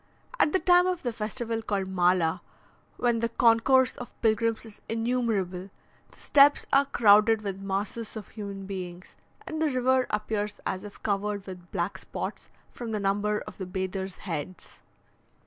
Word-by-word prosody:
At 300 - +4
the - - +3
time 360 -1 +5
of 365 -2 -2
the 240 -2 -2
festival 225 +1 -3
called 200 -3 -2
Mala, 180 -3 +2 0.6
when 240 -2 +1
the 230 0 0
concourse 240 +3 +4
of 245 - -10
pilgrims 225 0 +1
is 220 -2 -14
innumerable, 225 -6 -1 0.4
the - - -21
steps 285 0 +5
are 275 +1 +5
crowded 215 -3 +5
with 195 -1 -4
masses 200 +4 -3
of 210 - -8
human 200 -2 -7
beings, 185 -2 -7 0.3
and 315 0 -4
the 315 - +3
river 255 -1 +2
appears 210 0 -2
as 190 +1 -2
if 205 -1 -11
covered 205 -1 -1
with 180 -2 -10
black 175 +3 -2
spots - - -6 0.2
from 235 -2 -6
the 210 - 0
number 205 +1 0
of - - -11
the 190 - -4
bathers' 190 0 -4
heads. 170 0 -6
210 Hz, 160 wpm, -27 LUFS, 195-235 Hz, 0.6 s, time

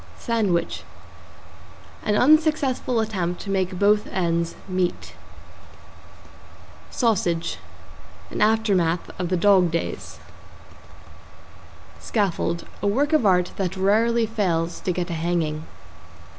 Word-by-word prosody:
=SANDWICH= 210 -8 -1 1.2
An 210 - 0
unsuccessful 280 -3 +3
attempt 185 -5 -2
to 195 - -5
make 185 -1 -1
both 210 +2 +3
ends 170 -2 -1
meat. 185 -2 -2 1.8
=SAUSAGE= 180 -8 0 0.7
An - - -4
aftermath 200 -6 +2
of 180 -2 -2
the 185 - +1
dog 185 -1 +4
days. 165 +1 -4 1.8
=SCAFFOLD= 180 -5 -1 0.2
A - - 0
work 280 +9 +1
of 295 -9 +4
art 180 -1 +3
that 190 -1 -2
rarely 225 +4 +2
fails 175 -7 -1
to 185 - -2
get 180 0 -3
a - - -1
hanging. 160 -2 -2
190 Hz, 105 wpm, -23 LUFS, 175-220 Hz, 1.8 s, dog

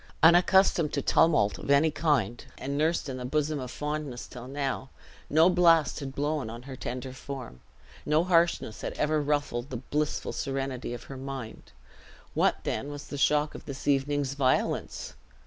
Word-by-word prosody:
Unaccustomed 175 -1 +5
to 140 - 0
tumult 110 -11 +3
of - - -8
any 140 +3 +5
king, 145 -6 +1 0.2
and 140 +1 -4
nursed 160 +3 +1
in 130 -1 -4
the 125 - -5
bosom 150 +3 0
of 130 -1 -5
fondness 150 -2 -4
till 125 0 -10
now, 135 -1 -3 0.4
no 160 +3 +6
blast 170 -6 +4
had 135 -2 -6
blown 145 -4 -1
on 115 +2 -8
her 135 0 -8
tender 130 +1 -5
form, 130 - -8 0.4
no 155 +2 +2
harshness 170 - +2
had - - -4
ever 150 0 +1
ruffled 145 -4 -1
the 130 - -4
blissful 150 +5 -2
serenity 135 -3 -3
of - - -9
her 135 - -9
mind. 130 -4 -7 0.6
What - - +1
then 135 +6 -2
was 145 0 -8
the 145 - -5
shock 150 +2 +2
of - - -10
this 140 -1 -7
evening's 140 0 +1
violence! 130 - 0
140 Hz, 165 wpm, -28 LUFS, 130-150 Hz, 0.6 s, no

